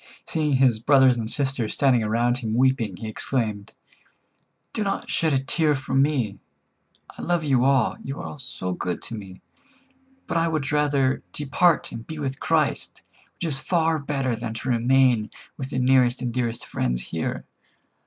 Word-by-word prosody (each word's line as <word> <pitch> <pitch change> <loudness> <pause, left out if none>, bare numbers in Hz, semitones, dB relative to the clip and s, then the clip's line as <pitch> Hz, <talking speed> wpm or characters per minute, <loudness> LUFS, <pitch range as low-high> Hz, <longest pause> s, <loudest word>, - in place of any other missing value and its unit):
Seeing 150 -3 0
his 130 -4 +3
brothers 130 +1 +5
and 115 -2 -3
sisters 135 -6 0
standing 130 -4 +3
around 120 +3 +1
him 110 -2 -2
weeping, 125 -6 +1
he 110 - -6
exclaimed: 110 -2 -2 1.0
"Do - - -2
not 195 - -3
shed 160 -1 +1
a 135 - +3
tear 150 +2 +1
for 135 0 -5
me. 135 -7 +1 0.8
I - - -8
love 175 -2 0
you 135 -4 +2
all; 135 -3 +2
you 135 +2 -5
are 150 - -7
so 110 -8 -5
good 90 0 -4
to - - -6
me, 95 -3 -10 0.8
but - - -1
I 165 0 +2
would 155 -2 -1
rather 140 -3 +2
depart 150 +4 +2
and 115 0 -8
be 160 - -6
with 135 -3 -4
Christ, - - 0 0.3
which - - -8
is 145 -5 -1
far 165 0 +1
better 135 -4 -1
than 115 0 -5
to 120 +3 -4
remain 120 -2 +3 0.3
with 135 -1 -6
the 135 - -4
nearest 130 -1 +3
and 120 -2 -2
dearest 120 -2 -2
friends - - -1
here. - - -4
130 Hz, 170 wpm, -24 LUFS, 115-145 Hz, 1.0 s, brothers